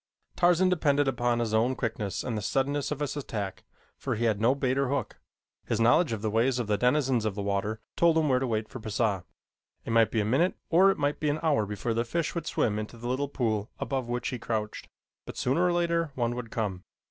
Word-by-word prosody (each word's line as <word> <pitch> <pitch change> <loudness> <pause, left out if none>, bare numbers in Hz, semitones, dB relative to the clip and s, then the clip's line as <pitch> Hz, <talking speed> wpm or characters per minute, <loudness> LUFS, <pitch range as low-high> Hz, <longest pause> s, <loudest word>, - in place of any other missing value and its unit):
Tarzan 175 +1 +4
depended 145 -5 +2
upon 120 -2 +1
his 115 -2 -1
own 120 +4 +2
quickness 110 -6 -3
and 125 -3 -3
the 105 - -2
suddenness 140 +6 0
of 150 -1 -4
his 145 - -2
attack, 105 -9 -5 0.4
for - - -2
he 115 +2 -1
had 105 -2 +1
no 120 +4 +4
bait 130 -2 0
or 140 0 +1
hook. 140 -1 -2 0.5
His 115 - 0
knowledge 120 +7 +4
of 110 -2 -3
the 110 - 0
ways 120 +4 +2
of 120 - -1
the 105 0 +1
denizens 125 0 +2
of 110 -3 -1
the 100 - -3
water 100 +2 -1 0.2
told 170 -1 +4
him 160 -1 +2
where 130 -2 +3
to 130 - -1
wait 110 -2 -1
for 130 - -8
Pisah. 110 -4 -1 0.6
It - - -3
might 115 -1 +5
be 115 - -1
a - - -1
minute 140 - +2 0.2
or 185 +4 +6
it 195 - +1
might 145 0 0
be 150 - 0
an 145 +2 0
hour 145 -10 +2
before 105 +3 -2
the 115 +1 +1
fish 165 +7 -2
would 165 -2 -4
swim 105 -2 0
into 110 +2 -7
the 120 +1 -6
little 135 +3 -1
pool 110 -5 -1
above 130 -3 -2
which 120 0 -2
he 125 - -4
crouched, 110 -2 -3 0.4
but - - -8
sooner 135 +8 +1
or 180 - +3
later 170 -1 +1
one 120 -1 0
would 120 -2 -6
come. 100 -5 -3
120 Hz, 240 wpm, -28 LUFS, 110-145 Hz, 0.6 s, or